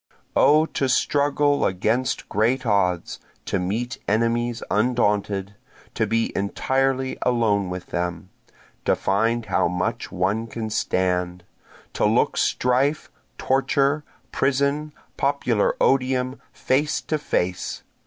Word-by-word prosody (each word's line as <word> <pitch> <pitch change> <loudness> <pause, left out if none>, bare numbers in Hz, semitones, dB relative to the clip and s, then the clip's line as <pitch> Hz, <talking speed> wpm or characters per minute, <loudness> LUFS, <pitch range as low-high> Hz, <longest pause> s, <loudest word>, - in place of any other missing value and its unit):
O 155 +2 +5
to 135 -4 -2
struggle 145 +2 +2
against 110 +8 0
great 120 +6 +1
odds, 90 -5 0 0.3
to 95 - -1
meet 115 +9 -3
enemies 115 +2 0
undaunted! 105 -3 +1 0.4
To - - 0
be 115 0 0
entirely 130 +6 0
alone 110 -6 +1
with 90 0 -5
them, 90 +1 -3 0.5
to - - +3
find 115 +4 0
how 95 - +1
much 90 +1 -2
one 100 +6 -1
can 110 -1 -5
stand! 90 -4 -1 0.5
To - - +1
look - - +2
strife, 130 +5 +1 0.3
torture, 140 +2 +1 0.3
prison, 140 +3 0 0.3
popular 135 -6 +1
odium, 130 -1 +1
face 145 +4 0
to 155 - -2
face! 90 -11 -2
115 Hz, 110 wpm, -23 LUFS, 100-135 Hz, 0.5 s, O